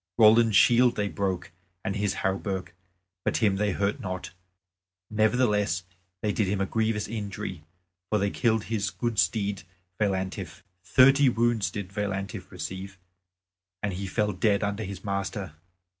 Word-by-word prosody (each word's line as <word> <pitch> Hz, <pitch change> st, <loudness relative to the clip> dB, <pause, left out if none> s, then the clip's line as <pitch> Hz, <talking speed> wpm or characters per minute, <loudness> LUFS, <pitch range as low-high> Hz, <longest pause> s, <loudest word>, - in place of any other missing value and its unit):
Roland's 110 Hz, -1 st, +6 dB
shield 120 Hz, +2 st, +6 dB
they 105 Hz, -1 st, 0 dB
broke 95 Hz, -4 st, -2 dB, 0.3 s
and 100 Hz, -, -1 dB
his 100 Hz, -1 st, 0 dB
hauberk; 95 Hz, -2 st, -2 dB, 0.5 s
but -, -, +1 dB
him 100 Hz, -4 st, +2 dB
they 105 Hz, 0 st, +1 dB
hurt 100 Hz, +2 st, 0 dB
not; 95 Hz, -1 st, -5 dB, 0.8 s
nevertheless 105 Hz, -5 st, +2 dB, 0.4 s
they 105 Hz, -, +2 dB
did 105 Hz, -1 st, 0 dB
him 100 Hz, +1 st, 0 dB
a 95 Hz, -, +1 dB
grievous 110 Hz, 0 st, 0 dB
injury, 100 Hz, -6 st, -5 dB, 0.5 s
for 105 Hz, -, +2 dB
they 100 Hz, 0 st, 0 dB
killed 110 Hz, -3 st, +1 dB
his 105 Hz, -3 st, -1 dB
good 110 Hz, +2 st, -2 dB
steed 100 Hz, -3 st, +1 dB, 0.4 s
Veillantif. 95 Hz, -2 st, -2 dB, 0.2 s
Thirty 135 Hz, +7 st, +6 dB
wounds 115 Hz, -3 st, +1 dB
did 100 Hz, -2 st, -6 dB
Veillantif 100 Hz, -1 st, -3 dB
receive, 95 Hz, +1 st, -6 dB, 0.9 s
and 100 Hz, -2 st, -1 dB
he 95 Hz, +2 st, -4 dB
fell 105 Hz, +2 st, 0 dB
dead 105 Hz, -1 st, +1 dB
under 100 Hz, +1 st, -1 dB
his 95 Hz, 0 st, -7 dB
master. 100 Hz, -3 st, -3 dB
100 Hz, 145 wpm, -27 LUFS, 95-110 Hz, 0.9 s, Roland's